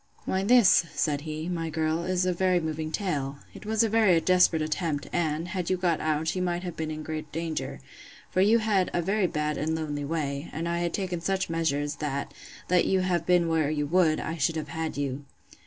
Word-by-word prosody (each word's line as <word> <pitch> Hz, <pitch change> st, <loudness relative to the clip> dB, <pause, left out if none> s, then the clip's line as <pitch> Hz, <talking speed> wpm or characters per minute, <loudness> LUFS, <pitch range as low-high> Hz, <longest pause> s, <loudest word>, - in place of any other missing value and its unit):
Why, 190 Hz, +1 st, 0 dB
this, 210 Hz, -6 st, +5 dB
said 145 Hz, 0 st, 0 dB
he, 155 Hz, +1 st, -5 dB
my 165 Hz, -2 st, -2 dB
girl, 160 Hz, +1 st, -1 dB
is 185 Hz, 0 st, +1 dB
a 185 Hz, -, +1 dB
very 185 Hz, 0 st, +2 dB
moving 155 Hz, -1 st, -3 dB
tale. 145 Hz, -8 st, -2 dB, 0.2 s
It -, -, -11 dB
was 220 Hz, +1 st, +2 dB
a -, -, +3 dB
very 215 Hz, -6 st, +4 dB
desperate 180 Hz, -2 st, +3 dB
attempt, 155 Hz, -1 st, -2 dB
and, 165 Hz, 0 st, -1 dB
had 180 Hz, -3 st, -3 dB
you 185 Hz, -, +1 dB
got 175 Hz, -3 st, +1 dB
out, 155 Hz, +2 st, 0 dB
you 185 Hz, -, -1 dB
might 175 Hz, 0 st, -1 dB
have 175 Hz, -3 st, -5 dB
been 160 Hz, -1 st, -3 dB
in 155 Hz, 0 st, -5 dB
great 155 Hz, -1 st, -5 dB
danger; 165 Hz, 0 st, -4 dB, 0.5 s
for 185 Hz, -, +2 dB
you 215 Hz, +4 st, +5 dB
had 210 Hz, -5 st, +1 dB
a 175 Hz, -, +1 dB
very 195 Hz, +1 st, +1 dB
bad 150 Hz, -2 st, -2 dB
and 160 Hz, +2 st, 0 dB
lonely 150 Hz, -2 st, -3 dB
way; 145 Hz, -1 st, -3 dB
and 165 Hz, +3 st, -3 dB
I 170 Hz, 0 st, -1 dB
had 175 Hz, 0 st, -1 dB
taken 180 Hz, -4 st, -3 dB
such 190 Hz, 0 st, -1 dB
measures, 145 Hz, -2 st, -1 dB
that, 140 Hz, -2 st, -3 dB, 0.3 s
let 180 Hz, -1 st, +3 dB
you 190 Hz, -1 st, +2 dB
have 175 Hz, -3 st, 0 dB
been 175 Hz, -2 st, +4 dB
where 160 Hz, -3 st, +1 dB
you 150 Hz, -1 st, -1 dB
would, 160 Hz, 0 st, +3 dB
I 165 Hz, +2 st, -4 dB
should 160 Hz, +2 st, +1 dB
have 155 Hz, -, -4 dB
had 160 Hz, -2 st, -4 dB
you. 140 Hz, 0 st, -3 dB
165 Hz, 220 wpm, -27 LUFS, 155-180 Hz, 0.5 s, this